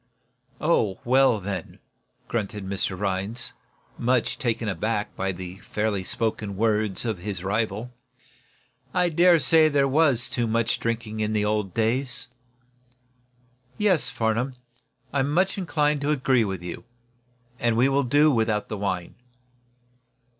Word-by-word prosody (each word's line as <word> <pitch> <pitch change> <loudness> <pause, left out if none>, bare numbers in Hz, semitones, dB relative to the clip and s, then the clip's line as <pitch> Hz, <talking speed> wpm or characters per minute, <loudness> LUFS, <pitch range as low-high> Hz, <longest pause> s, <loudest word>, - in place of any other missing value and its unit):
"Oh, 110 - +1
well, 130 -2 +4
then," 95 -3 -5 0.5
grunted 105 -3 -3 0.2
Rhinds, 100 +4 -3 0.5
much 125 +2 +1
taken 115 -6 -1
back 105 -1 -1
by 95 0 -1
the 90 +1 -8
fairly 105 -2 -2
spoken 105 -1 -3
words 110 -1 +1
of 110 -6 -2
his 95 -1 -5
rival. 110 +3 -1 1.0
"I 180 -1 +3
dare 170 +2 +5
say 160 0 +5
there 140 -2 +3
was 135 -4 +3
too 120 -2 -1
much 115 +1 +1
drinking 115 -1 -3
in 110 0 0
the 105 -1 +1
old 105 -3 -1
days. 120 +2 0 1.5
Yes, 185 -11 +2
Farnum, 120 +2 -1 0.6
I 140 - +1
am 135 +1 +1
much 185 +5 +2
inclined 150 -5 +1
to 145 - -1
agree 130 -5 +2
with 95 -3 -4
you, 90 - -6 0.8
and 120 -1 +1
we 125 +3 +5
will 135 +1 +2
do 145 +4 +4
without 110 -4 0
the 105 - -3
wine." 95 -3 -3
115 Hz, 130 wpm, -25 LUFS, 105-135 Hz, 1.5 s, dare